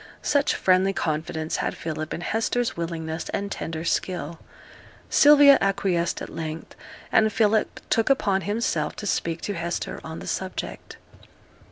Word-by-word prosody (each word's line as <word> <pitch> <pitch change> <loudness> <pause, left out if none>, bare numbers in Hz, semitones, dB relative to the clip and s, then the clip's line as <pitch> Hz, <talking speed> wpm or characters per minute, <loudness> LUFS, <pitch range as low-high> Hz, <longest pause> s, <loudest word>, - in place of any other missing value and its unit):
Such 285 -1 +2
friendly 185 +1 +3
confidence 160 -1 -2
had - - -2
Philip 155 -1 -4
in - - -4
Hester's 230 +5 -1
willingness 165 -1 -4
and 200 0 -3
tender 160 0 -4
skill. 170 -3 -2 0.7
Sylvia 290 -2 +7
acquiesced 190 -3 0
at - - -7
length, 160 0 -6 0.4
and 220 0 +4
Philip 215 0 +1
took 225 +2 +2
upon 200 -8 +2
himself 205 +6 -1
to 210 - -7
speak 165 -4 -1
to 205 - -3
Hester 170 -1 -4
on 160 0 -7
the - - -8
subject. 190 0 -5
185 Hz, 140 wpm, -25 LUFS, 165-215 Hz, 0.7 s, Sylvia